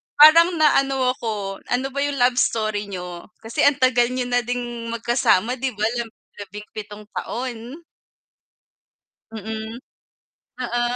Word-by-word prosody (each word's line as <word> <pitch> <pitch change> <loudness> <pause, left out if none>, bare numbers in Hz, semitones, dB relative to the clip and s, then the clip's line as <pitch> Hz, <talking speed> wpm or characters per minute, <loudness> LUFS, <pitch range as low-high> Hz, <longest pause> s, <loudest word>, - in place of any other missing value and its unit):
parang 335 +4 +8
na 310 -3 +5
ano 270 -2 +1
ako, 210 -6 -4
ano 255 +2 0
ba 280 - -4
yung 285 0 0
love 245 -1 +3
story 215 -2 0
niyo? 180 -2 -7 0.2
Kasi 225 +1 +2
ang 285 - +4
tagal 245 -2 +4
niyo 255 +1 -2
na 245 - +4
ding 240 -1 -4
magkasama 235 0 +1
'di 260 -3 -2
ba, 210 - -4 0.2
lab 235 - -3 0.3
labing-pitong 210 +1 -9
taon. 250 +5 -5 1.5
Mm. 220 +1 -6 0.8
Oo. 240 -1 -1
240 Hz, 130 wpm, -22 LUFS, 215-255 Hz, 1.5 s, parang